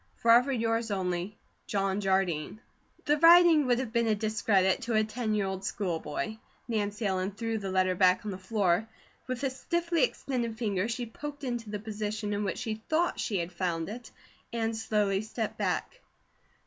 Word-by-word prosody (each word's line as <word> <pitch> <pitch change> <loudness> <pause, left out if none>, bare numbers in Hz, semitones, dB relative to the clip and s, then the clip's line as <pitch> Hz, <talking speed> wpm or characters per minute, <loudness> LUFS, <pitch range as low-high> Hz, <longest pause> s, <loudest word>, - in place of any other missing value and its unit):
Forever 240 +4 +5
yours 230 -2 0
only, 185 0 -2 0.3
JOHN 195 0 0
JARDINE. 190 -2 0 0.5
The 295 +1 +2
writing 335 -3 +7
would 245 -1 +3
have 250 -3 -3
been 235 -1 +2
a 215 - +3
discredit 205 -3 +2
to 230 -1 -1
a 215 - +4
ten 215 0 -2
year 205 -2 +1
old 190 0 -4
schoolboy. 195 +2 -3 0.3
Nancy 210 -2 -2
Ellen 190 0 0
threw 225 +1 -2
the 195 -2 -4
letter 185 0 +2
back 185 +3 +3
on 210 - -2
the 185 - -6
floor; 195 0 +1 0.4
with 255 +1 -4
a 270 - +1
stiffly 340 +4 -1
extended 240 -3 -1
finger, 205 -3 0
she 240 +1 -3
poked 285 +5 -8
it 260 - -2
into 235 -3 -4
the 210 - -3
position 210 0 -3
in 205 +1 -1
which 200 - -2
she 220 -3 -4
thought 335 +3 +1
she 205 - -1
had 170 0 -3
found 170 -2 -2
it, 235 +2 -8 0.4
and 225 -1 -1
slowly 210 -3 +1
stepped 220 +1 -4
back. - - -2
215 Hz, 180 wpm, -29 LUFS, 195-235 Hz, 0.5 s, writing